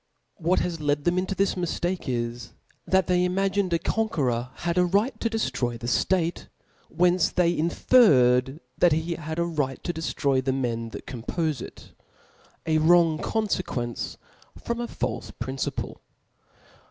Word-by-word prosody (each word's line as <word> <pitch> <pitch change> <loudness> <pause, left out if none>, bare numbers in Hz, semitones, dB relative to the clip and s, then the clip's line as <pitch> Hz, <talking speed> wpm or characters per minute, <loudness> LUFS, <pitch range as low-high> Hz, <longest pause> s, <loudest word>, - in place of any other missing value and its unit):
What 175 0 +1
has 170 -2 -3
led 145 -1 0
them 175 +2 +2
into 190 +1 -2
this 195 +1 +1
miftake^ 175 0 -2
is 120 -1 -3 0.3
that 190 -1 +3
they 180 0 +2
iniagtned 190 +1 +1
a 170 - +3
conqueror 135 - -1
had 170 -1 -2
a - - +5
right 210 +7 +1
to 230 - 0
deftroy 125 - -1
the 115 - -8
ftate; 165 +9 +1
frorn - - -13 0.4
whence 180 +2 +3
they 175 -1 +2
inferred 145 - +4 0.2
that 175 -3 +5
he 160 +2 -1
had 160 -1 -6
a 170 - +1
right 145 -6 -2
to 175 - -2
deftroy 140 -4 0
the 130 0 0
men 115 -3 -2
that - - -9
compofe 145 +4 -3
it; - - -11 0.7
a 160 -1 +2
wrong 165 -1 +4
confequence 185 - -2 0.4
from 235 0 -3
a 240 - -3
falfe - - -4
principle. - - -4
170 Hz, 155 wpm, -26 LUFS, 135-185 Hz, 0.7 s, a